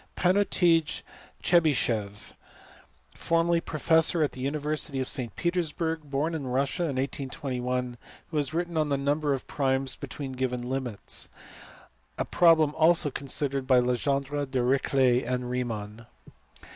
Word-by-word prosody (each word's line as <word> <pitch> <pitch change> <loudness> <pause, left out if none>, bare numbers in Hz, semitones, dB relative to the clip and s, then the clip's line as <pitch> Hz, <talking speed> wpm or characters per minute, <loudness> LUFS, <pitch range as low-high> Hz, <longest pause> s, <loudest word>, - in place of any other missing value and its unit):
Patnutij 175 -4 +2 0.4
Tchebycheff, 120 - +1 0.8
formerly 165 0 +1
professor 160 +1 +3
at 145 - 0
the 130 - -9
university 150 0 -2
of 130 - -2
St 125 -5 -1
Petersburg, 165 -3 -2
born 145 +4 -1
in 145 -5 -4
Russia 135 +7 0
in 145 -5 -2
1821, 125 -2 -3 0.3
who 155 - -2
has 145 -1 0
written 170 0 -2
on 155 -1 +1
the 140 - +1
number 145 +2 0
of 130 - -8
primes 135 -1 -1
between 140 -2 -6
given 125 -1 -3
limits: 125 -5 -3 0.9
a - - -1
problem 160 -4 +4
also 160 -1 +4
considered 140 0 -2
by 130 -2 +5
Legendre, 140 +3 0
Dirichlet, 130 0 +2
and 125 0 -3
Riemann. 115 -2 -4
140 Hz, 125 wpm, -27 LUFS, 125-160 Hz, 0.9 s, by